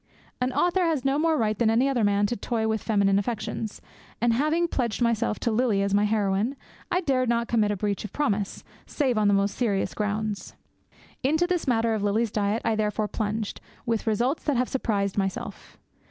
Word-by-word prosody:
An 250 +1 +1
author 355 +1 +2
has 310 -5 0
no 275 +2 +2
more 320 0 +2
right 215 -4 +1
than 230 - +3
any 235 +4 +3
other 255 -5 +1
man 205 0 +3
to 240 - -1
toy 220 +1 -1
with 220 -1 0
feminine 200 -3 +2
affections; 215 0 -4 0.4
and 235 0 +3
having 310 +7 +1
pledged 240 -8 -1
myself 235 -2 +1
to 235 - +1
Lily 220 -3 +2
as 200 0 -1
my 205 +1 +4
heroine, 210 +3 +1 0.4
I 360 - +2
dared 255 -6 +1
not 235 0 +1
commit 220 -3 +2
a 205 - -1
breach 205 0 -2
of 215 - -7
promise, 210 -8 -1 0.2
save 265 -5 0
on 210 - +3
most 200 0 +1
serious 210 -6 0
grounds. 210 0 -3 0.7
Into 315 +6 +2
this 355 -3 -1
matter 230 -2 +2
of 215 - -1
Lily's 210 +2 +1
diet 210 +1 0
I - - +2
therefore 210 0 -1
plunged, 215 -1 -3 0.2
with 230 -1 -1
results 240 +7 +1
that 290 -5 +1
have 250 +1 +1
surprised 205 -6 -1
myself. 195 -1 -4
225 Hz, 195 wpm, -26 LUFS, 205-255 Hz, 0.7 s, my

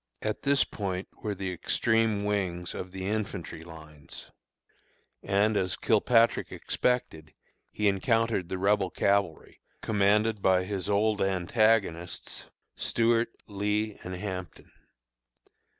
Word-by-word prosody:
At 110 -1 -2
this 140 0 +3
point 95 -2 -4
were 105 -1 -2
the 95 -1 -3
extreme 110 +3 +1
wings 90 -4 -1
of 90 - -6
the 95 0 -5
infantry 100 -5 -3
lines, 80 -3 -10 0.9
and 105 +2 +2
as 95 -2 0
Kilpatrick 115 +2 +3
expected, 80 -11 -2 0.4
he 105 - 0
encountered 110 -1 +1
the 95 - -2
Rebel 100 0 +2
cavalry, 100 -5 0 0.2
commanded 105 +1 +2
by 95 -1 +4
his 95 0 -4
old 105 +1 +2
antagonists, 95 -2 +1 0.3
Stuart, 115 0 +2 0.2
Lee, 105 +1 -1
and 90 0 -5
Hampton. 90 -3 -6
100 Hz, 110 wpm, -28 LUFS, 90-110 Hz, 0.9 s, by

